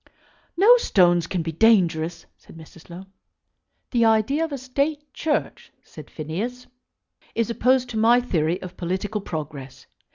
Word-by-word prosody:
"No 450 +7 +7
stones 175 - +2
can 175 -2 -2
be 165 - -4
dangerous," 170 -4 +2
said - - -17
Mrs. 160 +1 -15
Low. 175 +3 -10 0.9
"The 235 -2 +2
idea 225 +7 +2
of 325 - -3
a 280 - -3
State 280 +3 -3
Church," 300 -1 -3
said - - -13
Phineas, 205 +12 -5 0.7
"is 230 0 0
opposed 255 +2 +2
to 225 - -4
my 230 +3 +5
theory 170 -8 -1
of 185 0 -9
political 190 +4 -3
progress. 145 -6 -7
210 Hz, 140 wpm, -23 LUFS, 170-250 Hz, 0.9 s, No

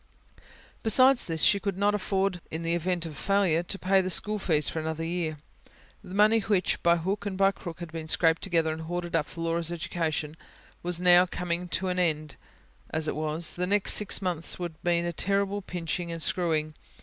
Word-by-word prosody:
Besides 255 +3 +5
this, 165 -2 -1
she 200 - +5
could 195 -1 -3
not 205 +1 +2
afford 195 -2 -1
in 160 +1 -5
the 165 0 0
event 175 0 0
of 165 - -5
a - - -12
failure, 195 -2 +1
to 175 +3 -1
pay 190 0 +3
the 185 - -3
school 210 +4 +1
fees 155 -6 +1
for 160 - -2
another 160 0 -3
year. 165 -2 -2 0.7
The 185 - -9
money 215 +2 +5
which, 195 -3 0
by 170 0 +4
hook 195 +5 -3
and 190 -2 -4
by 195 0 +4
crook, 175 -3 -9
had 170 -2 -7
been 160 -1 -6
scraped 165 0 +2
together 165 -4 0
and 160 - -7
hoarded 175 +1 -4
up 155 -3 +1
for 165 - -9
Laura's 165 0 -1
education 160 -2 -3 0.5
was 175 0 0
now 180 0 +6
coming 180 0 -3
to 185 +2 -1
an 180 0 -1
end; 155 -4 -1 0.5
as 160 0 -1
it - - -2
was, 155 +2 +1
the 180 +1 -2
next 205 +1 +2
six 210 -1 0
months 170 -3 -2
would 175 -2 -5
mean 170 -1 +1
a 170 - -2
terrible 200 +3 0
pinching 175 -1 -4
and 165 - -5
screwing. 155 -4 0
175 Hz, 205 wpm, -27 LUFS, 165-190 Hz, 0.7 s, now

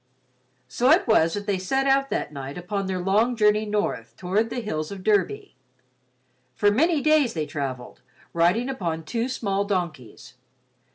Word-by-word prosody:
So 250 +2 +1
it - - +5
was 165 -7 +3
that 205 0 -5
they 200 -2 -1
set 265 +9 0
out 275 0 +2
that - - -3
night 135 +1 -7
upon 195 +2 -3
their 190 -1 -2
long 205 +7 +1
journey 210 -1 +2
north 205 - -2
toward 200 +5 0
the 245 - -3
hills 155 -9 -3
of 195 -2 -8
Derby. 400 - 0 1.0
For 205 -2 +3
many 310 +7 +2
days 300 -6 +3
they 155 -2 -1
travelled, 130 -4 -6 0.3
riding 180 +9 +2
upon 170 -11 -3
two 230 +10 -2
small 200 -6 -1
donkeys. 170 - -4
205 Hz, 160 wpm, -24 LUFS, 170-240 Hz, 1.0 s, it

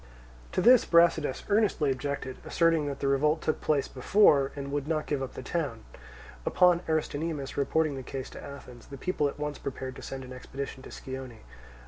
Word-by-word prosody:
To - - +1
this 245 0 +7
Brasidas 170 -5 +3
earnestly 200 -9 +2
objected, 130 0 -3
asserting 165 -3 +2
that 140 -1 -5
the 140 - +1
revolt 150 +3 +2
took 155 - -1
place 145 -3 +1
before, 140 -1 +4
and 140 -1 -5
would 145 0 -2
not 155 -1 0
give 145 -2 -1
up 135 - -5
the 130 - -6
town. 135 -8 -3 0.6
Upon 180 - +4
Aristonymus 155 -2 -2
reporting 150 +1 +1
the - - -4
case 130 +1 -6
to - - -10
Athens, 125 -4 -11
the 140 - -9
people 150 -1 0
at 140 - -5
once 150 0 -4
prepared 130 -1 -5
to - - -9
send 135 -1 -6
an 130 0 -9
expedition 135 +1 -7
to - - -11
Scione. 130 -3 -8
140 Hz, 185 wpm, -29 LUFS, 135-160 Hz, 0.6 s, this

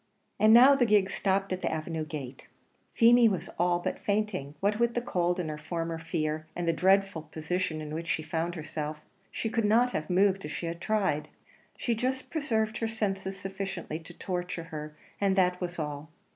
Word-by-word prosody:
And 215 +1 +6
now 250 +5 +9
the 260 -3 +3
gig 205 -2 +4
stopped 195 -1 0
at 185 - -4
the - - 0
avenue 160 0 -3
gate. 140 -4 -7 0.5
Feemy 235 0 +7
was 190 -4 -3
all 175 0 +3
but 175 - -3
fainting; 200 -9 -1
what 205 +2 +1
with 235 0 +2
the - - +2
cold 180 -6 0
and 175 - -2
her 150 - -6
former 165 +1 -3
fear, 155 -1 -2
and 175 -1 -2
the 165 - +3
dreadful 190 0 +3
position 160 0 -2
in 150 0 -6
which 165 +1 -4
she 155 - 0
found 165 +2 -2
herself, 150 -1 -5 0.3
she - - -3
could 230 0 0
not 235 +4 +4
have 155 -4 -3
moved 195 +1 +3
if - - -5
she - - -4
had 170 +1 -4
tried; 195 -9 0 0.5
she 235 - 0
just 255 +3 -2
preserved 225 -9 0
her 225 - 0
senses 195 -3 -2
sufficiently 190 -4 -5
to 160 - -13
torture 180 -2 -3
her, 150 0 -6 0.2
and 195 -1 +3
that 180 -1 +2
was 175 -1 -3
all. 150 -1 -4
180 Hz, 195 wpm, -29 LUFS, 160-210 Hz, 0.5 s, now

